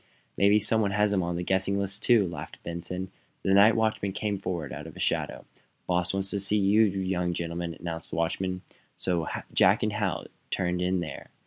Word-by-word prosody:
"Maybe 100 +1 +5
some 110 +1 +5
one 100 - +1
has 105 +1 +2
him 95 - +2
on 85 0 -2
the 90 - -2
guessinglist, 95 +2 +1
too," 110 -6 +4
laughed 80 -4 -7
Benson 90 +2 -5 0.3
The 95 - +2
night 105 +3 +7
watchman 110 -3 0
came 105 -1 -2
forward 85 -7 -4
out - - -7
of - - -11
a - - -9
shadow. - - -1 0.4
"Boss 90 0 +1
wants 95 0 -1
to 100 - -1
see 100 +2 +1
you 100 +2 +4
young 95 -4 0
gentlemen," 85 0 -4
announced 85 -1 -6
the - - -5
watchman. 90 +3 -1 0.3
So 85 -3 -1 0.3
Jack - - +4
and 110 -1 0
Hal 105 -6 -1 0.2
turned 90 -1 -1
in 90 0 +1
there. 80 -4 -7
95 Hz, 195 wpm, -27 LUFS, 85-100 Hz, 0.4 s, night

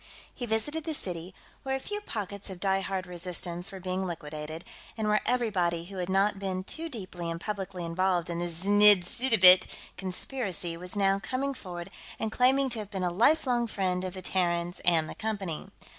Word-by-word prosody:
He 245 - -5
visited 295 +9 -1
the 315 0 -3
city, 175 -6 -4 0.3
where 265 0 -1
a - - -2
few 415 +9 -4
pockets 200 - -5
of 185 -2 -7
diehard 195 0 0
resistance 175 0 -4
were 190 - -7
being 185 +1 -2
liquidated, 155 0 -6 0.3
and 220 -1 -1
where 210 0 +3
everybody 185 -9 +1
who 195 +1 -9
had 180 0 -2
not 195 +1 +2
been 190 -1 -2
too 325 +11 -2
deeply 185 - -5
and 165 0 -3
publicly 190 -2 -4
involved 180 +1 +1
in 170 -1 -3
the 175 - -1
znidd 200 +3 +6
suddabit 190 -4 +6 0.3
conspiracy 185 -2 -3
was 180 +3 -8
now 195 -1 +3
coming 265 +6 -2
forward 175 -8 -7 0.3
and 220 - -2
claiming 265 +4 +4
to 235 - -1
have 210 -2 -6
been 190 -3 -3
a 180 - +1
lifelong 240 - +3
friend 185 -4 -1
of 185 0 -4
the 185 - -7
Terrans 175 -1 0
and 165 -3 +3
the - - -6
Company. 200 -7 -3
190 Hz, 185 wpm, -29 LUFS, 175-220 Hz, 0.3 s, znidd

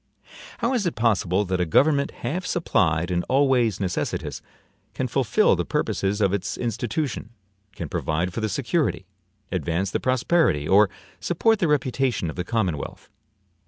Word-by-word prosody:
How 235 +3 0
is 220 -8 +1
it 170 - -2
possible 105 -4 +1
that 90 -1 -1
a - - +2
government 140 - +3 0.2
half 180 +5 -2
supplied 85 - +1
and 85 -1 0
always 130 -6 +3
necessitous, 95 -3 -3 0.5
can - - -1
fulfill - - +3
the - - -1
purposes 100 +2 -1
of 100 -2 +2
its 100 - -2
institution, 120 0 -3 0.5
can 85 - -5
provide 85 +5 -2
for 115 - -3
the 110 - -1
security, 125 - -1 0.5
advance 90 +2 -1
the - - 0
prosperity, 130 - +2
or 100 +1 +5 0.3
support 220 +6 +2
the 170 - +2
reputation 130 - 0
of - - -13
the 90 - -2
commonwealth? 95 - -3
110 Hz, 150 wpm, -24 LUFS, 90-140 Hz, 0.5 s, or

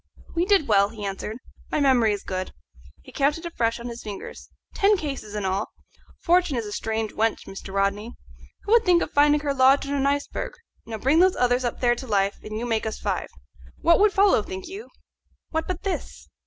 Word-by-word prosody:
"We 335 +1 +1
did 395 -7 +3
well," 200 -1 +4
he 215 -2 -7
answered. 200 +3 -4 0.3
"My - - 0
memory 255 -6 +4
is 205 -1 -3
good" 185 0 -4 0.5
he - - -13
counted 295 +4 0
afresh 235 -9 -1
on 235 - -9
his 235 0 -7
fingers 205 -2 -8 0.2
"ten 410 0 +3
cases 275 - -5
in 205 -2 -2
all. 190 +2 -2 0.4
Fortune 350 -5 +2
is 230 - -2
a 205 - -7
strange 220 0 -2
wench, 225 0 -1
Mr. 195 0 -9
Rodney. 200 +3 -1 0.5
Who - - -4
would 465 0 +6
think 355 -3 +4
of - - -6
finding 295 0 +4
her 285 -1 -1
lodged 270 +1 +4
on 280 - -3
an 275 -1 +1
iceberg? 285 - -2 0.3
Now 225 -1 -5
bring 270 +9 +3
those 370 +1 +5
others 250 +1 +2
up 240 - -3
there 240 -1 +4
to 255 +2 -7
life, 200 -2 +1
and 215 0 -6
you 235 - -3
make 225 -2 -1
us 220 - -4
five. - - -2 0.5
What 335 0 +5
would 420 0 +5
follow, 390 - +4
think 190 -2 -7
you? 395 +6 -9 0.6
what 320 0 -2
but 365 -2 -4
this?" 390 - -5
245 Hz, 210 wpm, -24 LUFS, 215-320 Hz, 0.6 s, would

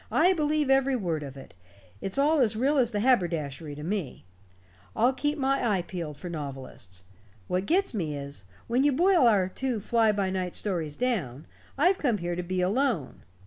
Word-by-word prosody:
"I 365 +2 +4
believe 300 -4 +1
every 270 0 +3
word 170 -9 -2
of 140 -2 -8
it. 135 - -12 0.5
It's 195 - -2
all 300 +3 +3
as 225 -4 +3
real 275 +6 +1
as 245 -3 +3
the 205 -2 -1
haberdashery 165 - 0
to 150 - -8
me. 175 - -4 0.7
I'll 245 +3 +3
keep 295 +3 -1
my 270 -3 +1
eye 175 - -2
peeled 170 -5 -6
for 180 - -8
novelists. 135 - -7 0.4
What 185 +2 -1
gets 385 +1 +2
me 160 -8 -2
is, 140 -6 -7 0.2
when 245 +3 +1
you 290 -1 +3
boil 350 -2 +4
our 200 -5 +3
two 250 +4 -3
fly 225 +1 +2
by 200 -2 -1
night 185 -2 -2
stories 165 -7 -2
down, 165 - -2 0.3
I've 360 +7 +3
come 245 -7 +1
here 175 -1 -3
to 180 - -2
be 180 +1 -2
alone. 200 - 0
205 Hz, 185 wpm, -27 LUFS, 165-265 Hz, 0.7 s, I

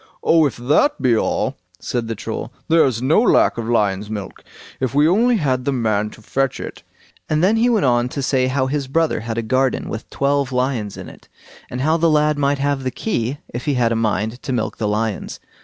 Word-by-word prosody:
"Oh! 160 -2 +4
if 135 - -7
that 150 - +2
be 125 -3 +3
all", - - -1 0.2
said 120 -2 -3
the 115 - -3
Troll, 110 +3 -5 0.2
"there's 135 -8 +3
no 150 +10 +4
lack 235 - +3
of 115 0 -4
lion's 105 -3 +1
milk, 105 -3 -6 0.4
if 130 -1 -2
we 145 +2 +5
only 230 +7 +3
had 130 -7 0
the 140 - 0
man 110 -5 0
to 110 - -15
fetch 135 +4 -1
it"; - - -7 0.5
and 155 +1 +1
then 200 +4 +4
he 235 +2 +3
went 220 -8 +2
on 120 -1 +2
to 140 +1 -4
say 130 -1 +1
how 130 0 0
his 140 0 -2
brother 160 +4 +1
had 115 0 -5
a 115 - -1
garden 130 +3 0
with 110 - -6
twelve 140 -1 0
lions 125 -5 -1
in - - -8
it, - - -14 0.4
and 125 - -4
how 155 +4 +2
the 165 0 +3
lad 150 -1 +2
might 140 0 +2
have 140 0 0
the 130 - 0
key 130 - -2 0.2
if 120 +4 -5
he 145 -3 +1
had 120 -2 +2
a - - +1
mind 110 +1 -1
to - - -5
milk 115 -4 -2
the 110 - 0
lions. 105 0 -2
130 Hz, 225 wpm, -20 LUFS, 115-145 Hz, 0.5 s, we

